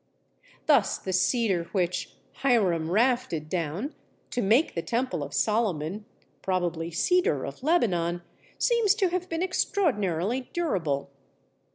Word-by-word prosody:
Thus 280 -10 +3
the 190 - -5
Cedar 190 -2 +2
which 180 -3 -1 0.2
"Hiram 185 -11 +2
rafted 215 -7 +1
down" 175 - -2 0.4
to 245 - -1
make 230 +9 +3
the 165 - -2
temple 230 - -1
of 145 0 -5
Solomon 200 - 0 0.4
(probably 175 -3 -1
Cedar 360 - +1
of - - -8
Lebanon) 175 - +1 0.3
seems 460 -4 +3
to 390 -5 +2
have 365 +1 -3
been 330 +1 -1
extraordinarily 250 - 0
durable. 165 - -1
205 Hz, 115 wpm, -27 LUFS, 170-275 Hz, 0.4 s, Thus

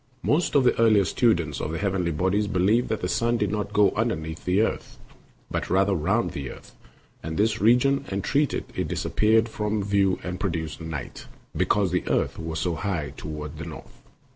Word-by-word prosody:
Most 155 +1 +1
of 140 - +5
the 125 - +3
earlier 110 -4 +5
students 85 - +1
of - - -3
the 80 - -3
heavenly 95 -3 0
bodies 95 +6 0
believed 100 +6 +2
that 110 - -2
the 90 - -1
sun 120 +5 +1
did 105 -3 0
not 105 -1 -2
go 105 -1 +4
underneath 80 -8 -3
the 90 +3 +3
earth, 110 - -2 0.5
but - - -2
rather 95 +1 +3
around 95 +7 0
the 70 -2 -5
earth - - -12 0.5
and 80 0 -5
this 110 +2 +1
region, 125 +5 +4
and 100 0 -2
that 145 -1 +1 0.2
it - - -2
disappeared 110 +1 +2
from 105 -2 -2
view 100 -2 +2
and 90 0 -4
produced 85 -6 -3
night, 80 -5 -6 0.3
because 100 -4 +1
the 90 - +1
earth - - 0
was 80 0 -4
so 85 +2 -1
high 85 -4 -3
toward 75 0 -7
the 85 - -5
north. 75 -6 -11
100 Hz, 190 wpm, -25 LUFS, 80-110 Hz, 0.5 s, of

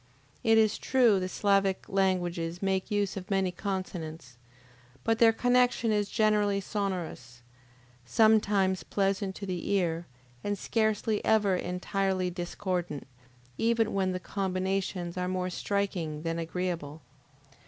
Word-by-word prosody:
It 225 0 +5
is 220 -1 +3
true 240 -7 +4
the 185 0 -3
Sclavic 195 -1 +1
languages 175 -3 0
make 190 0 -1
use 205 -2 0
of 195 +1 -7
many 195 -2 +1
consonants, 170 - -5 0.7
but 225 +6 +1
their 230 -1 +7
connection 245 -1 +2
is 205 -1 +1
generally 210 -2 +2
sonorous, 180 - -4 0.6
sometimes 200 - +3
pleasant 195 -1 -1
to 200 - -6
the 180 -3 -4
ear, 175 -4 0 0.4
and 205 0 -1
scarcely 220 0 0
ever 205 -4 +3
entirely 185 +1 -1
discordant, 175 -3 -3 0.5
even 230 -1 +2
when 190 -1 +1
the 185 - -3
combinations 190 -2 -2
are 180 0 -1
more 185 0 -2
striking 175 -6 -2
than 165 0 -2
agreeable. 165 -3 -4
190 Hz, 120 wpm, -29 LUFS, 180-205 Hz, 0.7 s, their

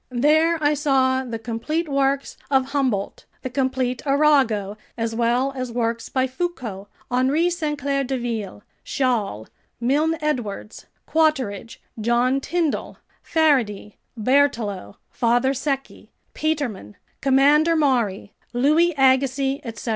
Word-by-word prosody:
There 310 +7 +3
I 290 +1 +4
saw 265 -3 +2
the 235 -3 -5
complete 235 +9 -3
works 275 -1 0
of 265 -1 +1
Humboldt, 255 -9 -1 0.2
the 260 - -4
complete 260 -1 -1
Arago, 270 -9 +2 0.2
as 230 -1 -2
well 240 +4 +1
as 255 -2 -4
works 230 -1 -2
by 260 -1 +1
Foucault, 255 - -5 0.2
Henri 275 +8 +2
Sainte 305 -4 -2
Claire 280 -1 -1
Deville, 235 -6 -4 0.2
Chasles, 220 - -1 0.3
Milne 295 +7 +1
Edwards, 240 -9 -4 0.2
Quatrefages, 260 -8 0 0.2
John 240 +4 +2
Tyndall, 335 0 -2 0.2
Faraday, 250 -11 +1 0.2
Berthelot, 220 - +1 0.2
Father 245 +2 +2
Secchi, 275 0 -4 0.2
Petermann, 275 - -3 0.3
Commander 290 +5 +4
Maury, 240 -11 0 0.2
Louis 305 +7 +3
Agassiz, 270 +1 +2
etc. 230 0 -6
260 Hz, 110 wpm, -22 LUFS, 235-285 Hz, 0.3 s, I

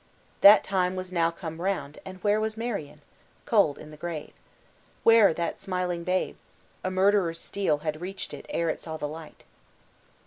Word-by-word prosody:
That 205 +2 +9
time 185 -1 0
was 185 0 -5
now 165 -2 +2
come 165 -1 -7
round, 180 -6 -2
and 185 -1 -8
where 210 +1 +3
was 220 0 -2
Marion? 180 -11 -4 0.4
cold 200 -10 +3
in 155 - -11
the 150 - -12
grave. 160 -1 -6 0.7
Where 225 -4 +7
that 170 +1 -3
smiling 180 -2 -2
babe? 185 +1 -1 0.5
a 185 - 0
murderer's 185 -3 +2
steel 195 -7 -1
had 155 +1 -2
reached 190 +2 -6
it - - -9
ere 170 -1 0
it - - -7
saw 160 -1 -6
the 150 - -3
light. 155 +1 -10
180 Hz, 170 wpm, -27 LUFS, 160-195 Hz, 0.7 s, That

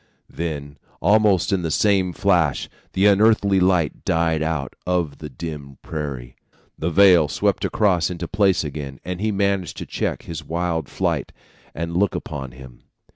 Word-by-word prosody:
"Then 75 -4 -5 0.2
almost 105 -3 +3
in 95 - +1
the 85 - -2
same 95 +1 +2
flash, 85 -7 +1 0.3
the 95 - +2
unearthly 100 -1 +4
light 90 -4 +1
died 80 -1 +1
out 80 -4 -2
of 90 -5 -1
the 75 - -7
dim 70 -4 -7
prairie, 70 -6 -5 0.4
the 80 - -2
veil 90 -3 +6
swept - - 0
across 95 -6 +2
into 85 -1 -5
place 100 -3 +2
again; 70 -3 -6
and 90 +1 -4
he 110 0 +1
managed 100 -3 -1
to - - -5
check - - -3
his 85 - -6
wild 85 -3 -2
flight, - - -1 0.4
and 85 +2 -4
look 100 +1 +2
about 65 -4 -6
him. 65 -2 -13
85 Hz, 155 wpm, -22 LUFS, 75-95 Hz, 0.4 s, veil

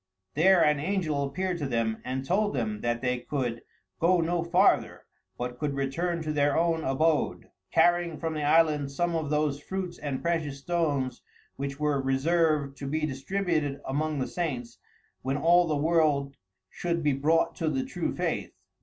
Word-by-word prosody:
There 175 +3 +5
an 150 -1 +3
angel 155 -4 -1
appeared 175 +6 -2
to 145 - -2
them, 115 -3 -1
and 130 +1 -3
told 205 +4 +1
them 110 -4 -2
that 120 0 -1
they 125 -1 0
could 120 -3 -3 0.4
go 175 +2 +4
no 170 0 0
farther, 180 +3 +2 0.3
but 125 0 -5
could 145 -2 -1
return 165 +5 -1
to 155 -1 -2
their 145 -1 +2
own 165 -1 +1
abode, 150 +4 0 0.2
carrying 175 -2 +3
from 160 0 -3
the 155 - -3
island 150 -1 +3
some 170 +5 -1
of 155 -3 -2
those 150 -1 0
fruits 185 +1 -5
and 140 -3 -4
precious 165 -5 -1
stones 140 -5 -1 0.3
which 140 +1 -5
were 150 -2 +1
reserved 140 +1 +1
to 140 - -6
be 155 +3 -1
distributed 155 0 -1
among 150 +3 -1
the 130 - 0
saints 125 -9 -4 0.4
when 135 +2 -1
all 170 +3 +4
the 155 - 0
world 145 -3 +2 0.4
should 170 -1 -2
be 145 -1 +3
brought 160 +5 +2
to 160 - 0
the 135 -3 -1
true - - -3
faith. - - -2
150 Hz, 170 wpm, -28 LUFS, 135-170 Hz, 0.4 s, There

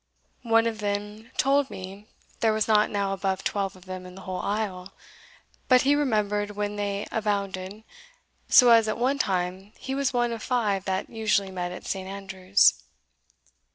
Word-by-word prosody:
One 225 0 +5
of 225 -2 -2
them 210 +2 -4
told 275 0 +2
me 195 +3 -9 0.3
there 225 - +3
were 215 0 +1
not 215 -1 +4
now 200 -1 -1
above 195 -1 -2
twelve 195 -2 -2
of 185 0 -17
them 185 -1 -7
in 180 - -12
the 195 - -10
whole 185 -1 -4
isle; 195 -3 -3 0.7
but 255 -1 +5
he 280 +2 +4
remembered 210 -7 0
when 205 0 -2
they 205 0 -2
abounded, 200 -1 -2 0.7
so 250 -4 +7
as 225 -1 +6
at 215 - -1
one 265 +4 +1
time 190 +1 -2
he 265 - -5
was 275 -1 0
one 240 -1 +1
of 230 -1 -5
five 210 -7 0
that 190 0 -2
usually 210 -3 0
met 180 -1 -4
at 180 - -9
St. 190 -1 -4
Andrews." 195 0 +2
205 Hz, 170 wpm, -26 LUFS, 190-225 Hz, 0.7 s, so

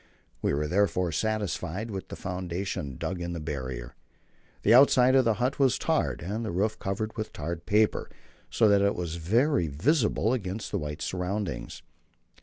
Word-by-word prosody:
We - - +1
were 75 +1 -1
therefore 90 -1 +1
satisfied 105 +1 -2
with 95 -2 -5
the - - -7
foundation 90 -6 -4
dug 90 -1 -3
in 85 0 -3
the 85 - -4
Barrier. 65 -5 -5 0.7
The 110 - +5
outside 130 0 +6
of 130 -2 +5
the 115 -2 +3
but 125 +5 -1
was 135 -3 +4
tarred, - - 0
and 105 +6 -3
the 110 - -3
roof 105 +5 -1
covered 110 +3 -3
with 110 -2 -4
tarred 85 +3 -5
paper, 105 +1 +2 0.4
so 110 - +3
that 100 -1 +5
it 100 0 +2
was 85 -2 -4
very 115 - +2
visible 110 - +1
against 105 -3 -4
the - - 0
white 75 +1 -5
surroundings. 95 +1 -3
95 Hz, 170 wpm, -28 LUFS, 85-110 Hz, 0.7 s, outside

